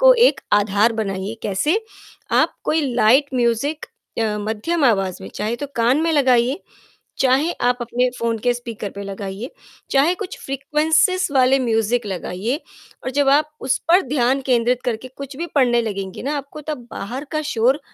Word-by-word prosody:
को - - +8 0.2
एक - - -4 0.2
आधार 205 +3 +2
बनाइए, 195 +2 -4
कैसे? 295 - +1 0.5
आप - - +3
कोई 310 -2 +1
लाइट 260 +5 +4
म्यूज़िक 245 +5 0 0.3
अ, 215 -2 0
मध्यम 285 +9 0
आवाज़ 195 -6 +1
में - - -7
चाहे 215 +3 -2
तो 285 - -5
कान 240 +5 +3
में 330 0 +1
लगाइए, 260 - +3 0.6
चाहे 270 +5 +3
आप 245 +1 +2
अपने 240 +1 0
फ़ोन 230 -1 -1
के 245 - +4
स्पीकर 230 -4 -6
पे 200 - -8
लगाइए, 195 +4 -6 0.4
चाहे 285 +6 +3
कुछ 395 -2 -6
फ्रीक्वेंसीज़ 310 +7 +2
वाले 260 +1 +5
म्यूज़िक 230 -2 0
लगाइए 195 - -3 0.5
और 260 - -2
जब 285 -1 +3
आप 295 +2 +4
उस 260 0 +1
पर 355 +3 +6
ध्यान 265 0 +2
केंद्रित 245 0 +2
करके 245 +1 -3
कुछ 275 -1 -8
भी 340 +4 -3
पढ़ने 240 -4 +3
लगेंगी 195 -3 -5
ना, 285 +4 -1
आपको 280 +2 -7
तब 250 -6 -6
बाहर 250 +8 -5
का 310 - 0
शोर 250 +6 +2
250 Hz, 165 wpm, -21 LUFS, 225-285 Hz, 0.6 s, को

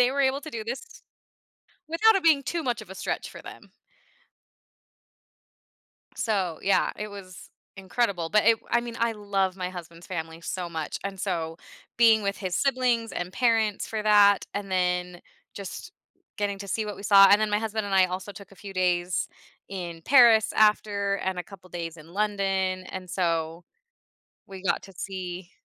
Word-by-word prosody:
they 250 0 +5
were 280 +1 -1
able 270 +1 +2
to 310 - -9
do 225 -5 -5
this 240 +4 -4 1.1
without 420 +8 +4
it 385 - 0
being 305 -4 +5
too 340 +3 -2
much 245 -5 -1
of 210 - -13
a - - -9
stretch 190 - -3
for - - -11
them. - - -12 2.5
So 190 -8 -1
yeah, 195 - +2
it 210 - -5
was 195 -3 -11 0.3
incredible, 190 -3 -1
but 210 +2 +3
it 230 - +6
w - - -27
I 235 - +3
mean, 235 -1 -7
I 230 0 +1
love 200 -3 -1
my 180 -1 -3
husband's 170 -1 -10
family 165 -2 -5
so 175 +1 -4
much, 160 -3 -4
and 195 -1 -5
so, 165 -4 -2 0.4
being 225 -2 +5
with 200 0 -1
his 185 -3 -4
siblings 250 -4 +1
and 180 +1 -4
parents 225 -2 +1
for 220 -1 -3
that, 205 -1 +5
and 200 -1 -4
then 180 -1 0 0.3
just 200 - -7 0.5
getting 200 -1 -2
to 200 0 -8
see 215 +3 -1
what 210 - -5
we - - -10
saw, 195 -1 +8
and 205 - +6
then 215 -1 +1
my 210 - +2
husband 220 -1 -3
and 200 - -2
I 190 -1 +6
also 185 +2 -5
took 200 +1 -13
a - - -16
few 200 +1 -9
days 180 -1 0 0.4
in 175 -4 -6
Paris 230 -2 +6
after, 205 -2 +2
and 190 -1 -3
a - - -2
couple 185 0 -14
days 165 -1 -5
in 155 0 -14
London, 195 -2 0
and 185 -1 -7
so 165 -2 -1 0.8
we 190 -1 -10
got 190 - 0
to 195 - -13
see 185 -1 -6
195 Hz, 185 wpm, -26 LUFS, 180-220 Hz, 2.5 s, saw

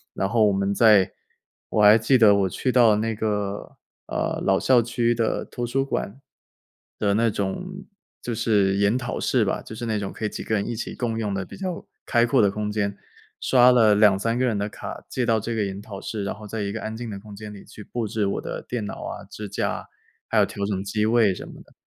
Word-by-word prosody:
然 95 - -1
后 110 -1 +4
我 100 - +2
们 100 +1 0
在 100 -3 +5 0.6
我 105 - +2
还 105 +2 +8
记 130 +4 +3
得 110 -4 +7
我 100 -1 +2
去 130 +8 -1
到 120 -4 +5
那 115 +1 -1
个， 105 -2 -3 0.3
呃， - - -2
老 - - +2
校 125 -2 +4
区 120 0 0
的 115 -1 -1
图 120 - -5
书 135 +3 0
馆 135 -1 -4 0.8
的 100 -1 +2
那 115 +1 +3
种， 180 - -4 0.4
就 120 - -3
是 100 -3 +2
研 100 +4 +2
讨 120 -1 -4
室 - - +2
吧， - - -1
就 110 - -10
是 120 +1 -5
那 110 -2 -1
种 100 -1 -5
可 - - -9
以 - - 0
几 - - -6
个 110 - 0
人 100 - 0
一 120 - -3
起 - - -5
共 115 -2 -2
用 105 -3 -2
的 100 -1 -2
比 - - -11
较 185 -3 -4 0.2
开 120 -1 +3
阔 120 +1 +3
的 100 - +4
空 105 0 -3
间， 100 -1 -2 0.4
刷 125 -1 +6
了 110 -4 +5
2-3 105 +3 +3
个 130 - +2
人 115 -4 0
的 100 +1 -2
卡， - - -8
借 125 - -1
到 115 -1 +2
这 115 +1 -3
个 105 - 0
研 100 0 -5
讨 105 -2 -8
室， 105 -3 -4
然 100 - -2
后 105 +1 -11
在 110 +1 -4
一 100 - -2
个 115 +2 -5
安 110 0 -5
静 120 0 -6
的 100 -2 -6
空 105 0 -12
间 105 0 -9
里 100 - -12
去 105 - -12
布 115 +1 -4
置 105 -1 -1
我 100 - -1
的 - - -6
电 120 -4 -3
脑 - - -5
啊、 100 - -6
支 105 +1 -8
架 - - -1
啊， - - -6 0.4
还 - - +1
有 - - +5
调 100 - -4
整 100 -2 -2
机 105 +2 -1
位 110 -4 +3
什 - - -8
么 - - -11
的。 - - -25
110 Hz, 265 characters per minute, -24 LUFS, 100-115 Hz, 0.8 s, 还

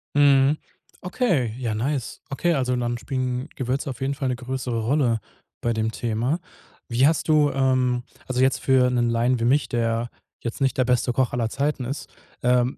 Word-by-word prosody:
Mhm. 140 0 +5 0.4
Okay, 180 - 0
ja 120 -4 -2
nice. 130 +3 -2
Okay, 170 +5 +1
also 125 -4 0
dann 120 -1 -1
spielen 130 +1 -2
Gewürze 130 +2 -2
auf 130 -1 -7
jeden 135 +1 0
Fall 140 -1 -3
'ne 125 - 0
größere 125 -1 -3
Rolle 120 -2 +2 0.4
bei 120 - 0
dem 110 0 -1
Thema. 120 +7 -1 0.5
Wie 125 +3 +4
hast 160 0 +1
du 150 -2 +5
ähm, 130 -2 +1 0.2
also 130 -1 0
jetzt 130 0 +3
für 130 -1 +3
'nen 120 -1 +1
Laien 120 +2 +2
wie 115 - 0
mich, 140 +4 +2
der 115 0 0 0.3
jetzt 115 +3 -4
nicht 135 -2 +1
der 130 - +3
beste 125 0 +1
Koch 130 -1 +1
aller 115 -2 0
Zeiten 140 0 -1
ist, 135 +4 -5 0.3
ähm, 125 +1 +2
125 Hz, 185 wpm, -24 LUFS, 120-135 Hz, 0.5 s, Mhm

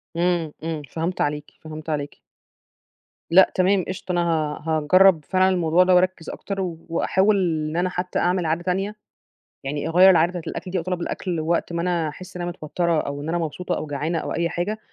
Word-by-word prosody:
إمم، 170 -2 0
إمم 160 -2 -3
فهمت 165 +3 -3
عليكِ، 150 0 -2
فهمت 155 0 -8
عليكِ. 145 -2 -4 1.1
لأ 185 +2 +7
تمام 185 0 +3
قشطة، 185 0 -5
أنا 175 -1 +1
ها 155 -3 -1
هاجرب 165 +1 +5
فعلًا 185 0 +3
الموضوع 175 -1 +3
ده 180 0 +4
وأركّز 180 -2 +1
أكتر، 195 -1 -5 0.3
وأحاول 190 +5 +2 0.3
إن 155 - -5
أنا 180 +1 +1
حتى 180 0 -3
أعمل 180 -1 +1
عادة 165 +2 -1
تانية، 195 +4 -1 0.7
يعني 145 +2 -3
أغيّر 180 +3 +7
العادة 170 -2 +5
بتاعة 180 -1 -5
الأكل 180 - -6
دي 190 - -1
أو 170 - -2
طلب 180 -1 -3
الأكل 175 0 -3
وقت 170 +2 -1
ما 170 - -1
أنا 170 -3 0
أحس 185 +5 -11
إن 180 - -5
أنا 175 0 -2
متوترة 170 -1 -1
أو 140 0 -5
إن 155 - -5
أنا 175 - 0
مبسوطة 170 +2 -3
أو 155 - -5
جعانة 150 +4 -2
أو - - -4
أي 170 0 0
حاجة، 205 +5 -3
175 Hz, 195 wpm, -23 LUFS, 160-185 Hz, 1.1 s, لأ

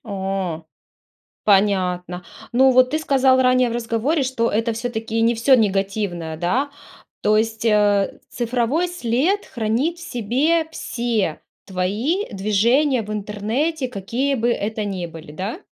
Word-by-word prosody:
О. 190 -5 -3 0.8
Понятно. 185 -3 +1 0.3
Ну, 260 +2 +5
вот 255 0 +5
ты 310 - 0
сказал 265 -3 +3
ранее 255 -1 +3
в - - -3
разговоре, 240 +6 0
что 255 -3 0
это 225 +2 0
всё-таки 225 -1 -2
не 235 +1 +3
всё 250 +4 +4
негативное, 195 -6 0
да? 245 - 0 0.5
То 215 0 +3
есть, 225 0 -2
э, 205 -2 +2
цифровой 245 +7 0
след 345 - 0
хранит 240 +9 -1
в - - -11
себе 285 +9 +1
все 230 - -2 0.3
твои 210 - -1
движения 230 +7 +2
в 210 +1 -6
интернете, 225 +9 -2
какие 245 +7 -2
бы 240 -1 +1
это 215 -1 -2
ни 185 -4 -3
были, 160 -2 -11
да? 195 - -4
225 Hz, 135 wpm, -21 LUFS, 200-260 Hz, 0.8 s, Ну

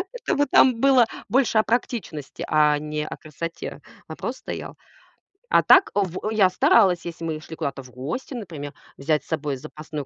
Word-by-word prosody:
Это - - -2
вот 285 -2 +1
там 245 -3 +5
было 265 -3 +6 0.2
больше 240 -1 +2
о 215 - +4
практичности, 225 - -3
а 150 -1 +4
не 150 0 -4
о - - -7
красоте 165 +2 -7 0.3
вопрос - - -5
стоял. - - -7 0.8
А - - +6
так 380 - +6
в 195 +1 -1
я 200 -4 +4
старалась, 185 -1 +4
если 170 -1 -6
мы 155 -1 -3
шли 160 0 -10
куда-то 140 -4 -4
в 125 - -15
гости, 150 - -5
например, 160 - -7 0.2
взять 150 +1 0
с - - -24
собой 145 -4 -2
запасное, 150 +1 -7
165 Hz, 175 wpm, -23 LUFS, 150-225 Hz, 0.8 s, было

